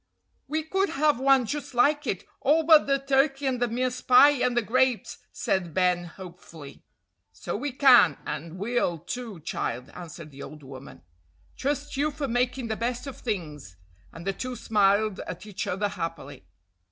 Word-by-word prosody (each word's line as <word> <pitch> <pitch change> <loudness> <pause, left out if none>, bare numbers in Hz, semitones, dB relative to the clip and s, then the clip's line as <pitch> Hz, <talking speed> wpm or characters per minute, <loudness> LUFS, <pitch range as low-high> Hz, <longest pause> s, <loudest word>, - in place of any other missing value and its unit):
"We 310 +3 -2
could 385 +5 0
have 295 -2 +1
one 270 -1 +4
just 285 +1 -5
like 290 +3 +3
it, 190 - -3
all 310 +4 +3
but 315 -2 +6
the 275 0 +3
turkey 275 +1 +1
and 255 -2 -1
the 245 - +2
mince 250 +2 -2
pie 265 +3 +7
and 250 -3 0
the 240 - +3
grapes," 255 +1 0
said 175 -4 -2
Ben 180 -1 +2
hopefully. 170 -5 -12 0.5
"So 90 -1 -6
we 280 +7 -3
can, 245 - +6
and 160 +3 -6
will, 205 -4 -1
too, 225 0 -7
child," 125 -5 -4
answered 170 -3 -10
the 140 0 -12
old 150 0 -10
woman. 135 0 -12 0.5
"Trust 285 +1 -3
you 295 +2 +1
for 290 -1 -4
making 245 0 -1
the 220 - -2
best 245 +2 -3
of 275 - -7
things," 150 - -5 0.3
and 165 +1 -11
the 195 - 0
two 255 +5 -5
smiled 210 -2 +2
at 175 - -7
each 205 -1 -5
other 200 +3 -1
happily. 165 - -7
235 Hz, 170 wpm, -26 LUFS, 175-270 Hz, 0.5 s, pie